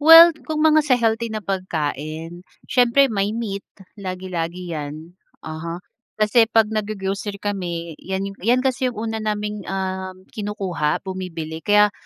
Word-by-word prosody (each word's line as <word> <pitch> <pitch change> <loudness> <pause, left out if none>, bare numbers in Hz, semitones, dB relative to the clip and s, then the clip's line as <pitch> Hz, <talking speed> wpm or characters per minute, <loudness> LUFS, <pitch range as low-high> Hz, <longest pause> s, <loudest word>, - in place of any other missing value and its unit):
Well, 330 +2 +10 0.2
kung 310 0 +1
mga 310 0 +6
sa 285 -4 +3
healthy 230 -1 +1
na 215 -1 -5
pagkain, 165 -2 -3 0.2
siyempre 250 +1 +4
may 205 +1 0
meat, 200 -4 -4 0.3
lagi-lagi 180 -2 -4
yan, 155 +2 -6 0.3
uh-huh. 160 +2 -5 0.4
Kasi 215 +2 +4
pag 220 -1 +3
nag-go-grocery 205 -1 -2
kami, 175 -5 -3
yan 190 +1 -3 0.2
yan 245 +6 +2
kasi 260 0 +1
yung 245 - -6
una 220 0 -3
naming 210 -1 -2
uhm, 190 -1 -3
kinukuha, 195 -8 -2
bumibili. 165 -4 -5
Kaya 210 +1 +4
200 Hz, 135 wpm, -22 LUFS, 175-225 Hz, 0.4 s, Well